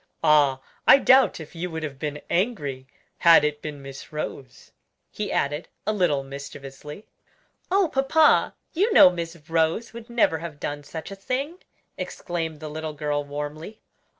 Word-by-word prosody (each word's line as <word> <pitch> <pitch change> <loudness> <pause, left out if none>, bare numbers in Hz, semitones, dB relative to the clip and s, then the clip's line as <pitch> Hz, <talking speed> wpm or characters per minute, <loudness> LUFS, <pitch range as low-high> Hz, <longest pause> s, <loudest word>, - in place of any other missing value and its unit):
"Ah! 145 -3 +4 0.3
I - - +10
doubt 265 -5 +5
if 160 -1 -10
you 175 +1 -4
would 160 -1 -5
have 140 -3 -6
been 150 0 -4
angry 150 - -1 0.3
had 165 -3 +7
it 150 0 -1
been 145 -2 -7
Miss 135 0 -10
Rose," 140 -4 -7 0.4
he - - -4
added, 145 +3 -1 0.2
a 215 - +1
little 170 -9 +1
mischievously. 140 +5 -9 0.6
"Oh, 385 0 +3
papa, 295 +2 +3 0.2
you 400 +7 +2
know 180 - +9
Miss 170 -1 -5
Rose 165 +8 0
would 235 +1 -10
never 230 -9 +2
have 160 -3 -8
done 145 0 -4
such 160 +5 -8
a - - -6
thing!" 275 - -3 0.4
exclaimed 165 -3 -4
the 155 - -5
little 155 0 -5
girl 145 -1 -2
warmly. 150 +8 -6
160 Hz, 155 wpm, -25 LUFS, 145-200 Hz, 0.6 s, I